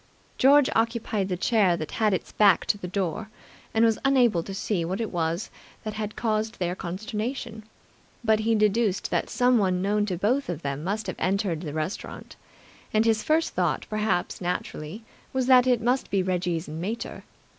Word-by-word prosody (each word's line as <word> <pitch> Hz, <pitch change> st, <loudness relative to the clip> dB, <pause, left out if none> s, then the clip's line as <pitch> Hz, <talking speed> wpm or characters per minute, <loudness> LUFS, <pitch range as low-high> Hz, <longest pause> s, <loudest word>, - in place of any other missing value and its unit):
George 280 Hz, +1 st, +6 dB
occupied 225 Hz, -3 st, 0 dB
the 180 Hz, -, -1 dB
chair 190 Hz, -3 st, +3 dB
that 155 Hz, -, -5 dB
had 215 Hz, -2 st, +1 dB
its 185 Hz, -, -2 dB
back 200 Hz, -4 st, +4 dB
to -, -, +2 dB
the 200 Hz, -3 st, -7 dB
door, 195 Hz, +3 st, -2 dB, 0.4 s
and 225 Hz, +1 st, +3 dB
was 225 Hz, -1 st, +2 dB
unable 250 Hz, -10 st, +4 dB
to 195 Hz, -, -8 dB
see 195 Hz, -2 st, -1 dB
what 185 Hz, +5 st, -3 dB
it 225 Hz, -, -2 dB
was 170 Hz, +2 st, -2 dB, 0.3 s
that 215 Hz, -, -4 dB
had 215 Hz, -1 st, -4 dB
caused 220 Hz, 0 st, -1 dB
their 175 Hz, -1 st, -1 dB
consternation; 220 Hz, +5 st, -4 dB, 0.6 s
but 220 Hz, -1 st, +3 dB
he 225 Hz, +1 st, +2 dB
deduced 210 Hz, -1 st, +1 dB
that -, -, 0 dB
someone 220 Hz, -8 st, +2 dB
known 205 Hz, +2 st, +1 dB
to 180 Hz, -3 st, -2 dB
both 245 Hz, +8 st, 0 dB
of 170 Hz, -2 st, -4 dB
them 140 Hz, +1 st, -3 dB
must 210 Hz, +4 st, -2 dB
have -, -, -5 dB
entered 190 Hz, -4 st, 0 dB
the 155 Hz, -5 st, -5 dB
restaurant; 155 Hz, +5 st, -5 dB, 0.6 s
and 215 Hz, +1 st, +2 dB
his 220 Hz, -1 st, +3 dB
first 315 Hz, +6 st, +1 dB
thought, -, -, 0 dB
perhaps 215 Hz, -5 st, -1 dB
naturally, 180 Hz, +2 st, -4 dB, 0.3 s
was 260 Hz, -1 st, +1 dB
that 255 Hz, -1 st, +6 dB
it 245 Hz, -2 st, +3 dB
must 250 Hz, +3 st, +1 dB
be 195 Hz, -2 st, +1 dB
Reggie's 175 Hz, -2 st, -1 dB
"mater". 180 Hz, +10 st, -5 dB
210 Hz, 175 wpm, -26 LUFS, 180-230 Hz, 0.6 s, George